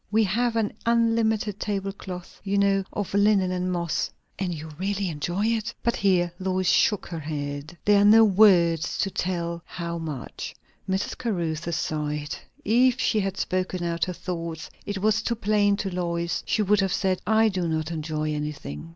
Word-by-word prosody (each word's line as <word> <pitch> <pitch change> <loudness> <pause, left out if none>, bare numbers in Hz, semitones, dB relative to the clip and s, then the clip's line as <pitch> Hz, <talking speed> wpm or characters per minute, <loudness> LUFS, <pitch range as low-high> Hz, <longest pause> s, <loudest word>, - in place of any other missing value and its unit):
We 220 +2 +3
have 230 +4 +1
an 220 -2 0
unlimited 225 -3 +2
tablecloth, 195 -3 -5
you 200 0 0
know, 200 -1 +3
of 205 -2 -4
lichen 200 -2 +3
and 185 0 -1
moss." 170 -2 -1 0.3
"And 190 -2 -1
you 160 -1 -6
really 195 0 -1
enjoy 175 +6 -2
it?" 230 0 0
But 235 - +1
here 180 -3 +2
Lois 185 -1 0
shook 210 +1 +3
her 170 -2 -4
head. 145 +1 -5
"There 205 -1 +5
are - - +5
no 220 +2 +8
words 180 -6 +4
to 195 - 0
tell 170 -2 -2
how 170 -1 -5
much." 150 -6 -6 0.3
Mrs. 190 +1 -1
Caruthers 170 -8 -2
sighed. 150 -1 -2 0.3
If 245 +3 +4
she 215 - +2
had 195 -1 -2
spoken 185 -1 -1
out 170 -1 0
her 180 - -4
thoughts, 170 -2 -5 0.2
it 205 -1 -2
was 215 +1 +3
too 235 +1 -1
plain 205 -2 +2
to 195 -2 -3
Lois, 170 -1 -1
she 215 - +2
would 205 +1 +3
have 195 -2 +1
said, 190 -2 0
"I 220 +1 +4
do 185 -4 -1
not 160 0 -1
enjoy 155 -1 -2
anything." 150 - -5
185 Hz, 175 wpm, -25 LUFS, 170-210 Hz, 0.3 s, no